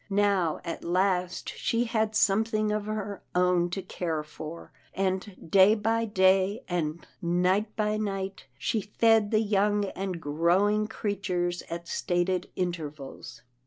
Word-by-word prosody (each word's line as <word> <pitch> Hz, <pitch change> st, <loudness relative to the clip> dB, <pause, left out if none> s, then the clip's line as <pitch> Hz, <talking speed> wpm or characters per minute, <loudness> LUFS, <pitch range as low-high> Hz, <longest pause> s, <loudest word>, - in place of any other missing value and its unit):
Now 195 Hz, -5 st, +2 dB
at 170 Hz, -, -5 dB
last 180 Hz, 0 st, 0 dB
she 230 Hz, +1 st, 0 dB
had 220 Hz, -2 st, 0 dB
something 215 Hz, +1 st, +2 dB
of 210 Hz, -1 st, -1 dB
her 205 Hz, -2 st, -4 dB
own 180 Hz, -1 st, +3 dB
to 190 Hz, +2 st, -4 dB
care 165 Hz, -4 st, -3 dB
for, 155 Hz, +2 st, -9 dB, 0.2 s
and 190 Hz, -2 st, -3 dB
day 195 Hz, +2 st, +7 dB
by 225 Hz, +2 st, 0 dB
day, 190 Hz, 0 st, +3 dB
and 170 Hz, -2 st, -2 dB, 0.2 s
night 185 Hz, +5 st, +1 dB
by 215 Hz, 0 st, 0 dB
night, 195 Hz, -6 st, -4 dB
she 215 Hz, +10 st, -1 dB
fed 220 Hz, +1 st, +3 dB
the 215 Hz, 0 st, +3 dB
young 205 Hz, -1 st, +2 dB
and 190 Hz, -2 st, -4 dB
growing 175 Hz, +8 st, +2 dB
creatures 185 Hz, -5 st, -2 dB
at 170 Hz, 0 st, -5 dB
stated 180 Hz, 0 st, 0 dB
intervals. 150 Hz, -8 st, -5 dB
190 Hz, 130 wpm, -28 LUFS, 175-210 Hz, 0.2 s, day